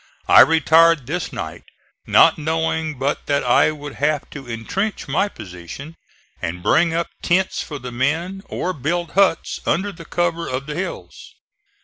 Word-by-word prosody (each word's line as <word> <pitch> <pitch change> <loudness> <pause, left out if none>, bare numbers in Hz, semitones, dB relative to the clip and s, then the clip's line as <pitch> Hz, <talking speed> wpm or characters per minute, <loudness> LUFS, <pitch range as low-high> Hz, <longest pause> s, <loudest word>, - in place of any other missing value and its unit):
I - - +9
retired 165 -2 +5
this 170 +5 -3
night - - -7 0.4
not - - +5
knowing 160 -1 -1
but 135 +3 -2
that 140 -1 +1
I 125 +4 +4
would 145 -2 -7
have 145 0 0
to 135 -3 -9
intrench 165 - -3
my 155 +8 +1
position, 90 - -10 0.5
and 85 +1 -4
bring 165 - +3
up 170 +1 -2
tents 185 +2 +1
for 145 - -6
the 125 -2 -8
men 160 +10 -1
or 185 - -2
build 170 +2 -2
huts 195 -4 +1
under 200 +4 0
the 165 -3 -12
cover 170 0 -1
of 130 +2 -3
the 150 - -5
hills. 185 +5 -7
160 Hz, 155 wpm, -20 LUFS, 140-170 Hz, 0.5 s, I